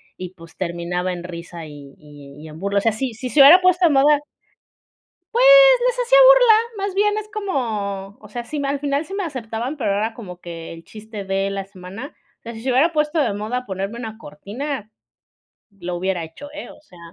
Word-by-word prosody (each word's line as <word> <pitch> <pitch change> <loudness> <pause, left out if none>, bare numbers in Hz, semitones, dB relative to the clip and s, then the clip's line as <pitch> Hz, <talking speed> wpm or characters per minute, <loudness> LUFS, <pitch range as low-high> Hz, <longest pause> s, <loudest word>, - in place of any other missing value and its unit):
y, 185 0 -8
pues, 165 -1 -15
terminaba 180 +1 -3
en 175 -1 -6
risa 170 -1 -8
y 145 -2 -12
y 145 -2 -14
y 160 - -10
en 155 - -11
burla. 200 +2 0
O - - -4
sea, 225 +1 +1
si 245 +2 -3
si 240 +4 -6
se 285 - +4
hubiera 330 +7 +9
puesto 365 -1 +3
de - - +2
moda 285 +2 +4 1.1
pues, 485 +2 +3 0.4
les - - 0
hacía - - +4
burla, - - +7 0.3
más 390 - -5
bien 415 +1 +2
es 430 0 -5
como, 215 - -3
o 210 - -15
sea, 240 +3 -5
si 305 - -6
m 285 -1 -2
al 280 0 -1
final 285 +2 -1
sí 385 - -10
me 395 -1 -2
aceptaban, 250 -2 -5
pero 235 -7 -1
era 215 +3 -1
como 180 -6 -10
que 165 -1 -8
el 165 - -12
chiste 215 0 -9
de 195 +1 -1
la 195 -1 -4
semana. 195 - -10 0.2
O - - -67
sea, 235 - -8
si 225 - -9
se 260 - 0
hubiera 290 +7 +3
puesto 300 +1 0
de 240 -8 +1
moda 220 +5 -4
ponerme 195 +4 -5
una 220 -2 -7
cortina, 220 - -7 0.8
lo 180 -3 -6
hubiera 175 -1 -2
hecho, 165 - -11
eh, 305 - -8
o - - -15
sea 180 - -19
220 Hz, 215 wpm, -21 LUFS, 180-285 Hz, 1.1 s, hubiera